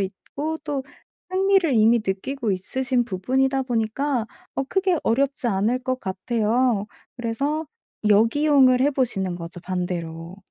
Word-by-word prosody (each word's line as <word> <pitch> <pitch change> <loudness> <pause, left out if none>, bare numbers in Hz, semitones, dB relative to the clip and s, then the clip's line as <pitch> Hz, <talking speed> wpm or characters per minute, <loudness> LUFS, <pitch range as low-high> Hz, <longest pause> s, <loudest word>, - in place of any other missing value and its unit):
있고 285 +11 -4
또 285 -3 -2 0.5
흥미를 380 -4 +3
이미 225 +2 +5
느끼고 220 +5 -2
있으신 245 +6 -1
부분이다 265 +7 0
보니까 240 +1 -1 0.3
어 270 - +1
크게 375 -2 +2
어렵지 270 +2 +1
않을 220 +4 +1
것 255 0 -1
같아요. 220 +3 0 0.3
그래서 280 +7 -2 0.4
역이용을 255 +4 +5
해 285 +2 +4
보시는 200 -9 -1
거죠, 170 +1 -8
반대로. 175 -1 -4
245 Hz, 280 characters per minute, -23 LUFS, 195-275 Hz, 0.5 s, 이미